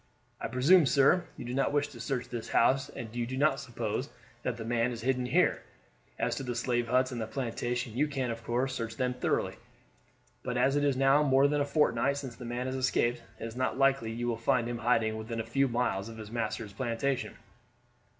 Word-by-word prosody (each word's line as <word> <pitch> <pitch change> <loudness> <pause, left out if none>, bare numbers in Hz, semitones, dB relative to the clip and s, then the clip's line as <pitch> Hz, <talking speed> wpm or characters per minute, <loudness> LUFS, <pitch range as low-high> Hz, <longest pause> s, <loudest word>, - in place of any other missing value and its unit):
I - - -3
presume, 140 +7 +5
sir, 145 +7 +4
you - - -7
do 120 - -4
not 135 +1 +1
wish 145 0 +1
to 120 - -12
search 125 +2 -3
this 120 -2 -5
house, 135 +3 +3
and 115 0 -8
you 120 -1 -1
do 130 +1 -4
not 140 -1 +3
suppose 120 +1 -3 0.3
that 120 -1 -2
the 115 - -6
man 120 +1 +1
is 120 -1 -6
hidden 125 0 0
here. - - +2 0.6
As - - 0
to - - -3
the 125 -2 -3
slave 120 0 0
huts 130 +2 +2
and 120 -2 -4
the 110 - -3
plantation, 120 0 -3
you 150 +4 +2
can, 135 -4 -2
of 115 0 -6
course, 125 +4 0
search 115 -3 -4
them 125 -1 0
thoroughly; 125 - -1 0.8
but 125 -1 -3
as 130 +3 +3
it 145 - +2
is 140 -3 +2
now 135 +2 +5
more 135 -1 +4
than 145 0 +1
a - - +2
fortnight 140 -2 +2
since 130 -4 -6
the 125 - -9
man 120 +2 -3
escaped, 125 -2 0 0.2
it - - -5
is 115 0 -7
not 130 0 -1
likely 135 -4 +2
you 120 +1 -3
will 115 -2 0
find 115 +1 +1
him 120 -1 -3
hiding 115 -2 +2
within 115 +1 -5
a - - -1
few 135 +4 +2
miles 115 -4 -1
of 115 - -9
his 110 -1 -9
master's 110 -2 -3
plantation." 130 +2 -2
125 Hz, 220 wpm, -30 LUFS, 115-135 Hz, 0.8 s, presume